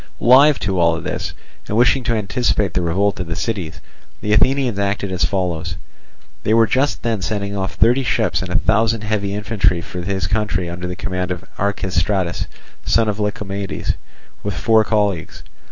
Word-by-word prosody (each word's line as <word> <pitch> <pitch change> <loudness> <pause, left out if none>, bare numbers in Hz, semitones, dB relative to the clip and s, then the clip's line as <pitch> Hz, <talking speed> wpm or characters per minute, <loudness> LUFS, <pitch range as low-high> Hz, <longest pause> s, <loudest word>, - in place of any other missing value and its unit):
Alive 135 +4 +6
to 95 -2 0
all 85 -1 +3
this, - - -4 0.3
and 105 - -1
wishing 125 +2 +4
to 115 - +1
anticipate 105 -3 0
the 90 - +1
revolt 95 +4 +1
of 90 - -3
the 80 - -3
cities, 95 -6 -3 0.4
the 105 - 0
Athenians 125 -1 +3
acted 100 -1 -1
as 90 -2 0
follows. 85 -2 -2 0.7
They 110 - +2
were 115 0 +6
just 135 +5 0
then 115 -3 -1
sending 100 0 -2
off 95 -1 -3
thirty 120 +4 +4
ships 120 - +1
and 95 - -5
a 90 - -3
thousand 110 +7 +2
heavy 100 -2 -1
infantry 105 -4 +1
for 90 +1 -6
his 95 +1 -2
country 100 -3 0
under 90 +1 -5
the 90 - -4
command 90 -2 -3
of 90 -2 -4
Archestratus, 95 -2 0 0.4
son 115 -1 +2
of 105 0 -3
Lycomedes, 100 -2 -2 0.5
with 105 - -3
four 110 -1 +4
colleagues. 105 -6 -1
100 Hz, 170 wpm, -19 LUFS, 90-110 Hz, 0.7 s, Alive